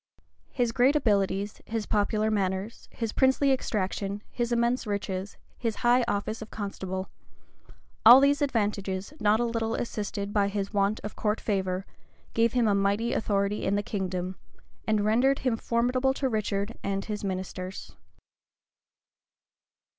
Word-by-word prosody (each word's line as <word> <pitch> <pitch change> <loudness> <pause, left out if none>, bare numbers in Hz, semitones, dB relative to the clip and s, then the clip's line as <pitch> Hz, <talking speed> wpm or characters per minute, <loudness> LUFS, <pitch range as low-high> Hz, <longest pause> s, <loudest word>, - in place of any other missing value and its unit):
His 245 -3 0
great 255 +5 +3
abilities, 200 -6 +1
his 225 -1 -2
popular 215 +1 +1
manners, 195 +1 -2
his 230 -2 -4
princely 265 +1 +3
extraction, 205 -4 -2
his 240 -1 -2
immense 235 0 +1
riches, 200 -1 -3 0.2
his 230 -3 -1
high 245 +1 +5
office 210 +2 -2
of 220 - -8
constable;[*] 190 -2 -4 1.0
all 240 +4 +11
these 280 +1 +3
advantages, 205 -4 -1
not 210 +1 +3
a - - +2
little 230 -1 -1
assisted 205 -3 -3
by 205 -2 +3
his 200 0 -3
want 200 +1 +1
of 210 - -6
court 210 0 0
favor, 190 -2 -1 0.5
gave 230 0 +2
him 245 -3 +3
a 205 - +3
mighty 200 +4 +1
authority 200 -1 0
in 195 - +1
the 205 - 0
kingdom, 185 -3 -3 0.5
and 215 -2 +2
rendered 250 +6 +3
him 250 -3 +2
formidable 250 +4 +1
to 270 - 0
Richard 215 -2 -2
and 195 0 -2
his 210 -1 -4
ministers. 185 -1 -5
210 Hz, 140 wpm, -28 LUFS, 200-235 Hz, 1.0 s, all